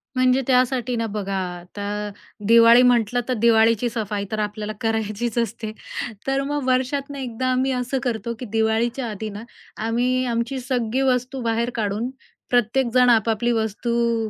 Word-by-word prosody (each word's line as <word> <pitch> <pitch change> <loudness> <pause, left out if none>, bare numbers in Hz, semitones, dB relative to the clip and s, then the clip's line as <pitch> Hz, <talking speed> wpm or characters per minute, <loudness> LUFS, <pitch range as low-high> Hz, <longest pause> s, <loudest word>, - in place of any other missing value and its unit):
म्हणजे 255 +1 +3
त्यासाठी 255 -1 +2
ना, 230 -1 -1
बघा 200 -2 -3 0.2
आता 205 +3 -5 0.4
दिवाळी 230 +1 +7
म्हटलं, 245 -1 +3
तर - - +2
दिवाळीची 230 +1 +4
सफाई 210 -3 -3
तर 215 - -2
आपल्याला 210 0 -3
करायचीच 225 +1 -1
असते. 230 -2 -2 0.6
तर 270 0 +1
मग 290 0 -2
वर्षातनं 270 +2 0
एकदा 255 -1 -3
आम्ही 260 +1 +1
असं 250 +1 -1
करतो, 235 -2 -2
की 250 - -5
दिवाळीच्या 225 +3 +1
आधी 215 +1 -5
ना, 210 +1 -8 0.4
आम्ही 250 +3 +1
आमची 240 +2 -1
सगळी 245 -1 -1
वस्तू 250 +1 -3
बाहेर 230 0 0
काढून 215 +2 -1 0.4
प्रत्येकजण 245 +1 +3
आपापली 230 0 +2
वस्तू 230 +1 0
235 Hz, 145 wpm, -22 LUFS, 220-250 Hz, 0.6 s, दिवाळी